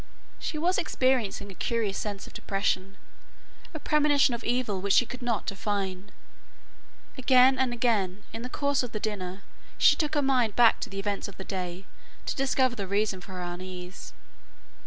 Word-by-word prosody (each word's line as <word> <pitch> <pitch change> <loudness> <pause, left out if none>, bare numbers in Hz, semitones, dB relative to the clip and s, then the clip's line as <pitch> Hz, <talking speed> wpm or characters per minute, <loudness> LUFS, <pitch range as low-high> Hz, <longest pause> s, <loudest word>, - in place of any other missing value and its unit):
She 310 - -3
was 350 +4 +2
experiencing 255 -9 0
a - - -9
curious 220 0 -1
sense 205 -2 -4
of - - -13
depression, 195 -1 -1 0.7
a 315 - -6
premonition 290 -3 +3
of 235 - -4
evil 235 -6 0
which 200 0 +2
she 245 - +5
could 250 +2 -8
not 235 -3 -1
define. 195 -1 -3 1.1
Again 260 0 +5
and 260 -2 +2
again 210 -6 0
in 225 - -5
the 250 - -5
course 280 +1 +1
of 245 -3 -5
the 215 - -2
dinner 195 -3 -4 0.3
she - - +6
took 310 -1 -1
her 290 - +2
mind 250 -6 +2
back 235 -2 +6
to - - -4
the 195 - -8
events 200 0 -2
of 200 - -12
the 190 - -6
day 185 -1 -5 0.4
to - - -2
discover 260 -2 +2
the 200 -4 -4
reason 200 -1 0
for 190 - -10
her 180 -1 -5
unease. 180 +1 -7
215 Hz, 180 wpm, -28 LUFS, 195-255 Hz, 1.1 s, she